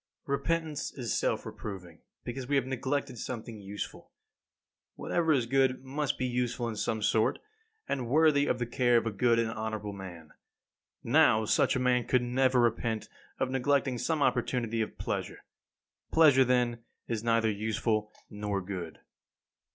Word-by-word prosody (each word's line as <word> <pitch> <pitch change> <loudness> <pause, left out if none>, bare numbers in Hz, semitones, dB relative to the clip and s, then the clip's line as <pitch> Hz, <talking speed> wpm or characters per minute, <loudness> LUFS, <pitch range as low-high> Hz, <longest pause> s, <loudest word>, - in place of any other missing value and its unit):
10. - - -6
Repentance 160 0 -1
is 120 -4 -2
a - - 0
self - - 0
reproving, 90 -5 -8 0.2
because 125 +1 -5
we 145 - +1
have 135 -2 +2
neglected 130 -1 -2
something 115 -3 -6
useful. 100 +1 -7 0.9
Whatever 165 -2 0
is 130 -6 +3
good 130 +1 +2
must 140 +2 -2
be 130 - -1
useful 125 -1 -1
in 115 - -4
some 110 +1 -2
sort, 110 +1 +2 0.5
and 130 -4 -2
worthy 150 0 +4
of - - +1
the 120 - -2
care 120 0 +3
of 115 - +1
a 115 - -1
good 115 +3 +2
and 115 -1 +1
honourable 110 -2 -4
man. 90 -5 -9 0.7
Now, 110 0 +4
such - - +2
a - - +1
man 125 -1 +2
could 125 -1 +3
never 130 +1 +2
repent 115 -1 0 0.3
of 130 -1 -1
neglecting 135 -1 +1
some 155 +3 0
opportunity 115 -4 0
of 110 - -4
pleasure. - - -4 0.7
Pleasure, 150 -5 +6
then, 120 -2 +1 0.3
is 115 -2 -2
neither 115 -1 +2
useful 110 0 -1 0.2
nor 105 -1 -3
good. 90 -5 -6
120 Hz, 160 wpm, -30 LUFS, 110-130 Hz, 0.9 s, Pleasure